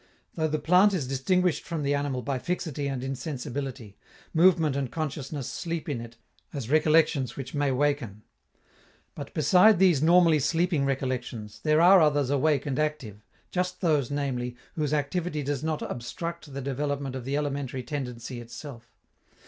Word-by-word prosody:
Though 160 -1 0
the 155 0 -1
plant 185 +6 +4
is 145 -8 -2
distinguished 175 +6 +1
from 165 -3 -4
the 140 0 +1
animal 140 -3 -1
by 135 -2 -2
fixity 155 -3 -3
and 135 -2 -3
insensibility, 135 - -5 0.4
movement 165 -4 +4
and 135 -3 -2
consciousness 150 -3 -4
sleep 170 -2 -4
in 135 -6 -2
it 115 0 -11 0.3
as 135 -4 -5
recollections 155 -4 +3
which 130 -2 -6
may 145 -2 +1
waken. 130 -6 -1 0.9
But, 145 -2 -8
beside 180 +7 +5
these 175 -6 +4
normally 165 -1 +5
sleeping 165 0 +1
recollections, 125 -5 -3
there 155 +1 +3
are 185 +1 +7
others 145 -3 +2
awake 145 0 +2
and 140 -1 -2
active, 130 -9 -3 0.3
just 180 0 -2
those, 150 -8 +2
namely, 130 -4 -2 0.2
whose 150 -4 -1
activity 150 +1 -1
does 140 0 -2
not 155 -1 -2
obstruct 165 +6 -6
the 140 +1 -5
development 140 0 -3
of 130 - -5
the 135 +3 -1
elementary 140 -3 -3
tendency 125 -4 -5
itself. 120 0 -10
145 Hz, 155 wpm, -27 LUFS, 130-160 Hz, 0.9 s, are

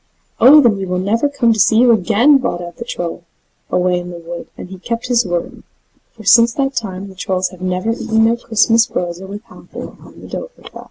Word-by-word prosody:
"Oh, 285 +6 +8
then, 230 -6 +3
we'll 180 - -1
never 225 +9 0
come 255 -5 +2
to 220 - -4
see 220 +2 +4
you 245 +1 +5
again," 230 +7 +4
bawled 175 -9 -3
out 175 -1 -10
the 235 - -7
Troll 175 -6 -5 0.5
away 180 0 +1
in 175 0 -8
the 175 - -8
wood, 170 0 -8
and - - -8
he 190 -1 -10
kept 230 +5 -5
his 240 -4 +2
word; 175 -1 -4 0.5
for 225 - -14
since 230 +3 +5
that 275 -1 -1
time 195 -5 -5
the 195 - -12
Trolls 185 0 -2
have 185 -1 -15
never 185 +4 -1
eaten 220 -1 0
their 230 +1 +2
Christmas 230 0 +2
brose 175 0 -4
with 200 +3 -8
Halvor - - -11
on - - -16
the - - -11
Dovrefell. - - -9
215 Hz, 215 wpm, -16 LUFS, 180-235 Hz, 0.5 s, Oh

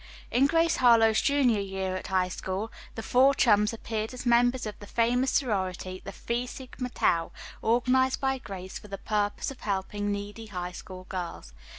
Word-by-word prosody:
In 265 +3 +4
"Grace 330 +2 +2
Harlowe's 225 -3 +5
Junior 265 -6 +3
Year 190 -1 -3
at 185 - -5
High 185 -1 +1
School" 190 +4 -4 0.2
the 225 - -5
four 265 +2 +4
chums 210 -4 +4
appeared 225 0 -4
as 250 - -7
members 245 +1 +3
of 215 - -4
the 205 - -10
famous 245 +4 +2
sorority, 185 -7 -1
the 195 - -6
"Phi 235 +4 -3
Sigma 250 0 -6
Tau," 165 -8 +1 0.3
organized 255 +3 +2
by 265 -1 0
Grace 190 -5 -7
for - - -13
the 195 -1 -6
purpose 205 +4 -1
of 270 - -11
helping 205 +1 -2
needy 205 +2 -5
High 180 -3 -4
School 185 +1 -9
girls. 175 - -6
220 Hz, 175 wpm, -28 LUFS, 190-250 Hz, 0.3 s, Harlowe's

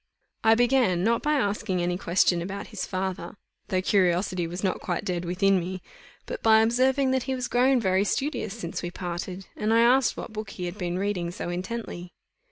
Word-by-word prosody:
I 225 0 +6
began, 240 -7 +3
not 230 +2 +2
by 300 0 +1
asking 205 -7 0
any 175 0 0
question 175 -1 +2
about 195 +3 -6
his - - -3
father, 185 -2 -4 0.3
though 185 -1 0
curiosity 180 -2 +1
was 175 +4 -6
not 190 - 0
quite 175 +2 -3
dead 180 -3 -2
within 190 +2 +2
me, 185 +2 -4 0.5
but - - -6
by 220 0 +6
observing 260 +3 +2
that 260 0 +1
he 265 - +1
was 250 -1 -3
grown 255 +1 +3
very 190 -3 +2
studious 235 -2 -2
since 170 -6 -5
we 175 - -4
parted; 180 +1 -5
and 215 +1 -1
I 230 +1 +5
asked 250 +2 +4
what 220 - -7
book 215 -1 -5
he 180 -2 -6
had 175 +4 -6
been 175 -1 -2
reading 190 -3 -1
so 175 - -5
intently. 180 -1 -5
195 Hz, 195 wpm, -26 LUFS, 180-230 Hz, 0.5 s, I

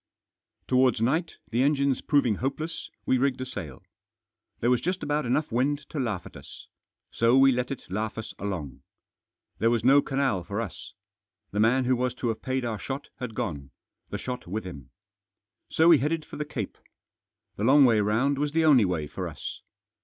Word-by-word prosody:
Towards 130 -2 +3
night, 160 +9 0
the 120 +2 +1
engines 140 -1 +2
proving 130 -8 +2
hopeless, 145 +6 -4 0.2
we 130 - +2
rigged 130 -1 +1
a 130 - -3
sail 80 - -7 0.8
There 120 - +2
was 125 - +2
just 180 +2 -2
about 145 -2 0
enough 145 +5 0
wind 140 +5 0
to 150 - -4
laugh 105 -8 -2
at - - -12
us. - - -11 0.5
So 115 +3 +3
we 135 0 +7
let 125 0 -1
it 135 - -6
laugh 105 +4 -3
us 110 - -6
along. 85 -10 -5 0.8
There 115 - +3
was 115 -1 +1
no 135 +3 +6
Canal 135 -11 0
for 100 +4 -4
us. 105 -2 -6 0.6
The 105 - -2
man 120 +4 +3
who 130 +1 +3
was 125 0 -1
to 120 - -2
have 110 - -3
paid 130 -1 -2
our 110 -3 -3
shot 135 +1 -5
had 125 -4 -5
gone 80 - -4 0.2
— - - -53
the - - -3
shot 125 -5 -6
with 105 +5 -3
him. 70 -8 -9 0.8
So 160 +1 +4
we 165 -4 +7
headed 155 +2 -1
for - - -9
the 150 - -3
Cape. 120 -9 -5 0.8
The 105 - -3
long 135 +4 +7
way 115 -3 +4
round 125 +7 +1
was 145 0 -1
the 165 0 +3
only 135 -8 +6
way 90 -5 -1
for - - -5
us. - - -7
125 Hz, 195 wpm, -27 LUFS, 110-140 Hz, 0.8 s, we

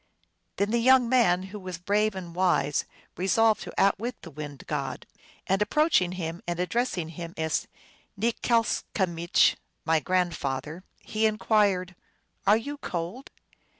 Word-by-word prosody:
Then 200 +1 0
the 235 - +2
young 255 +1 +5
man, 230 -8 +3
who 210 - -5
was 185 -2 -6
brave 205 +4 +1
and 175 -3 -7
wise, 175 -5 +1 0.3
re 185 - -2
solved 225 +1 +3
to - - -7
outwit 225 +5 +1
the 165 - -9
wind 145 -1 -8
god. - - -4 0.4
And 195 +2 +1
approaching 210 - +2
him 170 -1 -5
and 175 0 -2
addressing 180 -3 -1
him 170 +1 -8
as 160 -1 -1 0.5
Nikslcamich, 210 -6 +1
" - - -48
My 160 0 +3
grand 180 0 0
father," 150 +6 -4 0.2
he 220 +1 +1
inquired, 200 -3 +1 0.3
" - - -27
are 210 +2 +7
you 285 +5 -6
cold 180 - -5
185 Hz, 150 wpm, -27 LUFS, 170-220 Hz, 0.5 s, are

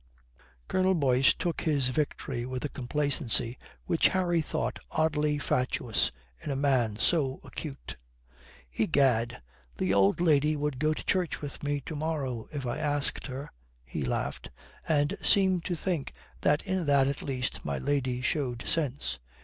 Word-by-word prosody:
Colonel 185 0 +2
Boyce 135 -3 +4
took 175 -2 -2
his 140 -5 +1
victory 135 -3 -2
with 130 +2 -4
a - - -2
complacency 130 -3 0 0.3
which 165 - +4
Harry 175 -3 +1
thought 155 - -2
oddly 150 -2 +1
fatuous 125 -4 +1 0.3
in - - -4
a 140 - 0
man 130 -6 +2
so 135 +2 +1
acute. 140 -3 -7 0.8
"Egad, 120 - +2 0.4
the 95 +1 +1
old 100 +5 +4
lady 155 -3 +3
would 145 -3 -2
go 155 +1 +2
to - - -7
church 180 -3 0
with 145 -2 -6
me 145 0 -1
to 155 - -6
morrow 145 -7 -3
if 145 -4 -4
I 120 - -2
asked 145 -1 -1
her;" 135 +2 -5 0.4
he 70 +4 -5
laughed, 60 - -2 0.4
and 150 +3 +2
seemed 190 -3 +4
to 175 - -1
think 165 -4 -2 0.3
that 145 0 +3
in 185 -4 -1
that 140 -2 +5
at 140 0 -2
least 130 -2 -3
my 70 -1 -2
lady 130 - 0
showed 125 -3 -1
sense. 145 -4 -1
145 Hz, 150 wpm, -29 LUFS, 125-155 Hz, 0.8 s, that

